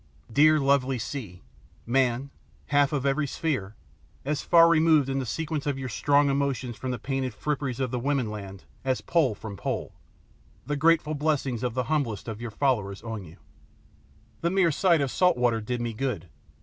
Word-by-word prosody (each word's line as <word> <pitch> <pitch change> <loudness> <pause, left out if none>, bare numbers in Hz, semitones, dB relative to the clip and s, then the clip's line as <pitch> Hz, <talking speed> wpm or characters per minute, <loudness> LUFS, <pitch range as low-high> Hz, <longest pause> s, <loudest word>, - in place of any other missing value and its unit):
Dear, 155 +3 +6
lovely 135 -2 +2
sea, 110 -6 -6 0.4
man 130 +2 +1 0.4
half 145 -1 +3
of 140 -3 -1
every 140 +1 +1
sphere, 130 -10 -2 0.5
as 150 +1 -1
far 165 -1 +6
removed 160 -4 +4
in 135 0 0
the 130 - -3
sequence 155 +2 -3
of 140 -2 0
your 130 -1 -4
strong 145 +5 +3
emotions 135 -3 -1
from 130 - -5
the 125 - -2
painted 130 -3 -3
fripperies 140 -4 -2
of 130 -2 -1
the 125 - -1
woman 130 -3 0
land 100 -2 -8 0.2
as 130 -1 0
pole 150 -10 +1
from 100 -1 -8
pole - - -3 0.7
the 145 - -2
grateful 155 +1 +3
blessing 140 -5 -1
of 125 -2 -2
the 125 - 0
humblest 125 -8 -2
of 110 0 -6
your 120 - -4
followers 105 -5 -1
on 110 -3 -5
you! 80 +1 -14 1.0
The 170 - +1
mere 185 -2 +3
sight 170 0 +3
of 135 -2 -1
salt 180 -6 +3
water 120 -2 +2
did 120 +3 -3
me 120 -1 -3
good. 110 -8 -3
135 Hz, 180 wpm, -26 LUFS, 120-145 Hz, 1.0 s, Dear